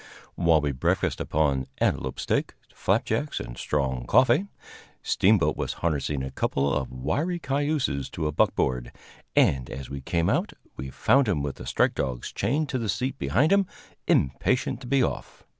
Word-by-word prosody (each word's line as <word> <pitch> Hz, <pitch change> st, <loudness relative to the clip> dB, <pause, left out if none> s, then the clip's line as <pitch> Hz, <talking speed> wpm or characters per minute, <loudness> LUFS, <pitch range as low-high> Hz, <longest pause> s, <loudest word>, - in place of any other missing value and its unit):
While 85 Hz, -3 st, +3 dB
we 75 Hz, -1 st, 0 dB
breakfasted 65 Hz, -, 0 dB
upon 70 Hz, -4 st, +1 dB
antelope -, -, -1 dB
steak, -, -, -1 dB, 0.2 s
flapjacks -, -, 0 dB
and -, -, -7 dB
strong 65 Hz, -4 st, -2 dB
coffee, 130 Hz, +10 st, +4 dB, 0.6 s
Steamboat 100 Hz, -1 st, +3 dB
was -, -, -2 dB
harnessing 75 Hz, -4 st, -1 dB
a 65 Hz, -, -5 dB
couple 70 Hz, +1 st, 0 dB
of 65 Hz, -2 st, -1 dB
wiry 150 Hz, -, -1 dB
cayuses 140 Hz, -, -1 dB
to 80 Hz, -, -3 dB
a 75 Hz, -, 0 dB
buckboard, 65 Hz, -4 st, +1 dB, 0.4 s
and, 65 Hz, -2 st, +3 dB
as 65 Hz, 0 st, -7 dB
we 70 Hz, -1 st, -5 dB
came 85 Hz, +5 st, 0 dB
out, -, -, 0 dB, 0.2 s
we 65 Hz, +1 st, -6 dB
found 135 Hz, -, +3 dB
him 80 Hz, -9 st, 0 dB
with 70 Hz, -1 st, -4 dB
the -, -, -9 dB
strike -, -, +2 dB
dogs 65 Hz, -4 st, -3 dB
chained 150 Hz, +5 st, 0 dB
to 130 Hz, -, -1 dB
the 115 Hz, -3 st, -3 dB
seat 125 Hz, +7 st, -2 dB
behind 120 Hz, -, +2 dB
him, 200 Hz, -1 st, +4 dB, 0.4 s
impatient 125 Hz, -, +1 dB
to 125 Hz, -, -8 dB
be 135 Hz, 0 st, +3 dB
off. -, -, -4 dB
75 Hz, 165 wpm, -26 LUFS, -, 0.6 s, coffee